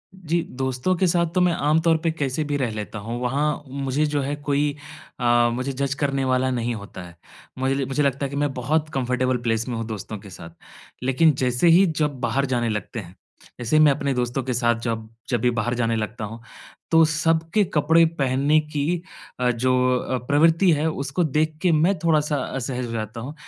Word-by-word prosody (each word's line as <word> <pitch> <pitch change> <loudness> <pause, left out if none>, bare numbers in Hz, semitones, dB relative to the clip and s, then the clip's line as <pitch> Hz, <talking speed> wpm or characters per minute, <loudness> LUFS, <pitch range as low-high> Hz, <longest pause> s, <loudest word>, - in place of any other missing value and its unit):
जी, 170 -2 -1 0.2
दोस्तों 130 +6 0
के 185 +1 +2
साथ 170 0 +2
तो 180 - +3
मैं 180 -1 +3
आम 150 +1 +2
तौर 165 -1 +3
पे 165 - +2
कैसे 145 -1 -2
भी 145 -1 -2
रह 125 -5 -1
लेता 105 0 -6
हूँ, 115 +3 -5
वहाँ 145 +4 0
मुझे 135 +2 -1
जो 145 -1 -1
है 140 +2 -2
कोई 145 0 -1 0.4
अ, 120 -1 +3
मुझे 130 +3 -2
जज 140 +1 -1
करने 135 -1 0
वाला 130 0 +1
नहीं 120 -1 -1
होता 100 -3 -9
है। 85 - -15 0.4
मुझे 135 +1 0
मुझे 135 +2 0
लगता 140 0 0
है 135 - -3
कि 140 - -6
मैं 145 -1 0
बहुत 150 +5 -1
कंफर्टेबल 125 -1 0
प्लेस 115 +1 0
में 120 - -2
हूँ 115 - -3
दोस्तों 110 0 -6
के 100 0 -12
साथ। 85 -2 -11 0.5
लेकिन 145 +4 +4
जैसे 125 +5 +1
ही 175 +4 +7 0.2
जब 145 -3 -2
बाहर 125 +3 0
जाने 120 -3 0
लगते 110 +2 -4
हैं, 90 -1 -10 0.4
जैसे 120 +4 -1
ही - - +6
मैं 150 - +6
अपने 140 0 -1
दोस्तों 125 +1 -1
के 130 - -2
साथ 120 0 +2
जब 110 -2 -3 0.2
जब 120 -3 0
भी 125 - +3
बाहर 120 +1 -1
जाने 115 -1 0
लगता 110 +1 -3
हूँ, 115 +3 -8 0.5
तो 165 0 +6
सबके 165 +5 +1
कपड़े 165 +2 +4
पहनने 140 +3 +3
की 150 +3 -2 0.4
अ, 125 0 +2
जो 130 +2 0 0.2
अ, 130 +1 -2
प्रवृत्ति 165 +5 +4
है 155 +1 +1
उसको 140 +4 -2
देख 155 +1 0
के 180 -2 +3
मैं 170 +5 +3
थोड़ा-सा 155 -2 +1 0.2
असहज 125 -2 -3
रहता 110 +1 -5
हूँ 140 +5 -6
135 Hz, 205 wpm, -23 LUFS, 120-150 Hz, 0.5 s, ही